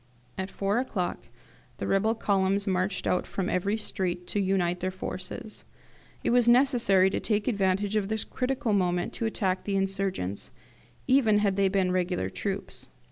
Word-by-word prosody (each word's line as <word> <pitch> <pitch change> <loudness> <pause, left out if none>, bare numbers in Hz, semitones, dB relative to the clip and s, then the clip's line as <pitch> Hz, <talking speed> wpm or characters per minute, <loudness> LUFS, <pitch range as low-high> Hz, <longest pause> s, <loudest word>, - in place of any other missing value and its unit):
At 190 0 -4
four 200 +4 0
o'clock 200 -8 -2 0.6
the - - -4
rebel 215 +4 +2
columns 200 -2 +1
marched 185 0 -1
out 180 - +1
from 190 -2 -2
every 200 +4 0
street 180 -4 -2
to 205 - 0
unite 185 -2 +1
their 185 - -1
forces. 185 +3 -7 0.6
It - - +1
was 240 -1 +4
necessary 235 -7 +4
to - - -1
take 210 -2 0
advantage 200 -2 +1
of 205 -2 +1
this 220 0 -1
critical 255 -3 -1
moment 180 -3 +1
to 225 - -2
attack 190 -4 -1
the 200 - -2
insurgents, 195 - -2 0.6
even 240 -6 +4
had 205 -2 +2
they 200 0 +3
been 190 -1 +1
regular 180 - -1
troops. - - -4
195 Hz, 160 wpm, -28 LUFS, 185-215 Hz, 0.6 s, was